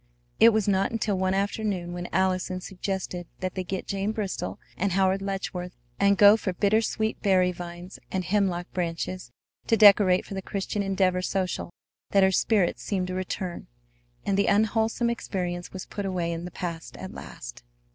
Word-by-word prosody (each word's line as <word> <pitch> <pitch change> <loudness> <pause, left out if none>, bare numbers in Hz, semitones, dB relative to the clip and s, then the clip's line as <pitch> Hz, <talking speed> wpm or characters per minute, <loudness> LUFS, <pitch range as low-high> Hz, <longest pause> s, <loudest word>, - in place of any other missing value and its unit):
It 230 - +9
was 215 -2 +1
not 195 -1 +2
until 220 -3 0
one 190 0 +1
afternoon 195 -3 -1
when 175 0 -5
Allison 185 -1 0
suggested 185 -2 -4
that 185 -1 -3
they 185 - -3
get 185 +1 -4
Jane 200 +2 -2
Bristol 210 -4 -3 0.2
and 195 0 0
Howard 190 0 +2
Letchworth 190 -2 -4 0.3
and 200 0 +4
go 205 +1 +8
for 190 -4 -2
bittersweet 220 +3 +1
berry 185 -2 +3
vines 175 +1 -8
and 190 -1 -1
hemlock 185 -2 +1
branches 175 -3 -3 0.4
to 225 - +3
decorate 200 -3 +6
for - - -8
the 190 - -3
Christian 200 +2 -3
Endeavor 190 -2 +1
social 185 -1 -2 0.4
that 195 -1 +6
her 190 - +5
spirits 195 -1 +2
seemed 185 -3 -2
to - - -3
return, 185 -1 -4 0.6
and 200 0 +1
the 200 - +3
unwholesome 220 +3 +2
experience 180 -6 -4
was 190 - -7
put 205 -1 -4
away 175 -3 -1
in 170 +1 -4
the - - -5
past 170 -2 -6
at - - -7
last. - - -9
190 Hz, 170 wpm, -26 LUFS, 180-200 Hz, 0.6 s, It